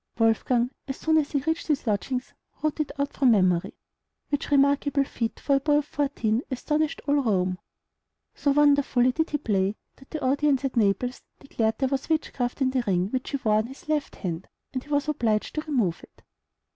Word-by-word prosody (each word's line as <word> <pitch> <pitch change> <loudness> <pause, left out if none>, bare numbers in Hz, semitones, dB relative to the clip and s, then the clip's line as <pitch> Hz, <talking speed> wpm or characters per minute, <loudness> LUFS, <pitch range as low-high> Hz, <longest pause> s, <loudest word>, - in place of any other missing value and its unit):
Wolfgang, 235 +2 +2 0.2
as 270 - -4
soon 315 0 +3
as 290 - -1
he 280 - +1
reached 320 +2 -1
his 295 -4 0
lodgings, 250 +4 -2 0.3
wrote 310 0 0
it 305 - -1
out 280 0 -1
from 265 -2 +3
memory; 185 -6 +2 0.5
which 285 -1 -2
remarkable 280 0 +3
feat 230 -4 -4
for 280 -1 +2
a - - 0
boy 295 +2 +2
of 295 - 0
fourteen 270 -7 0
astonished 300 +3 -1
all 285 0 +3
Rome. 185 -6 0 0.7
So 285 - -1
wonderfully 280 -3 +4
did 320 +5 -1
he 295 - 0
play, 200 -6 0 0.2
that 265 - -18
the 310 -4 -4
audience 280 0 +2
at 265 - -2
Naples 235 +3 +1 0.2
declared 225 -5 -1
there 265 -2 0
was 275 +2 -2
witchcraft 275 -5 -1
in 260 - +2
the 255 -2 0
ring 185 +1 +1
which 260 -1 -2
he 280 - -1
wore 215 -1 +3
on 215 +1 0
his 270 +4 -13
left 305 -2 -1
hand, 175 -1 -5 0.3
and 255 -1 -3
he - - -18
was 290 0 +1
obliged 230 -8 0
to 305 - -1
remove 240 - 0
it. - - -18
270 Hz, 195 wpm, -26 LUFS, 225-290 Hz, 0.7 s, wonderfully